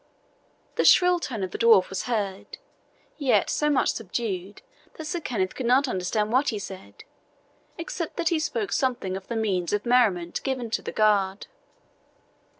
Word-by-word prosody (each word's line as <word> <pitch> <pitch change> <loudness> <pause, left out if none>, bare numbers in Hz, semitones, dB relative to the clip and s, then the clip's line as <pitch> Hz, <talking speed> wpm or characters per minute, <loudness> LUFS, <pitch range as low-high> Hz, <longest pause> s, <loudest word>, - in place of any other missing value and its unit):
The - - +3
shrill 360 -1 +6
tone 230 - -4
of 185 - -4
the - - -6
dwarf 225 -5 +5
was 195 - -3
heard, 205 -5 -3 0.6
yet 275 -4 +2
so 300 - +1
much 285 - +2
subdued 200 - -4 0.3
that 315 - -8
Sir 325 +3 -3
Kenneth 200 - -2
could 255 - -4
not 265 +3 +4
understand 210 +1 -1
what 265 +3 +3
he 220 - -2
said, 185 - -9 0.7
except 335 -1 -5
that 340 -2 +1
he 335 - +1
spoke 415 +7 -2
something 245 -9 -1
of 190 0 -8
the 235 - -4
means 195 -6 -1
of 205 0 -1
merriment 210 -9 +2
given 255 -4 -3
to - - 0
the - - -5
guard. 205 -2 +1
225 Hz, 165 wpm, -25 LUFS, 190-270 Hz, 0.7 s, shrill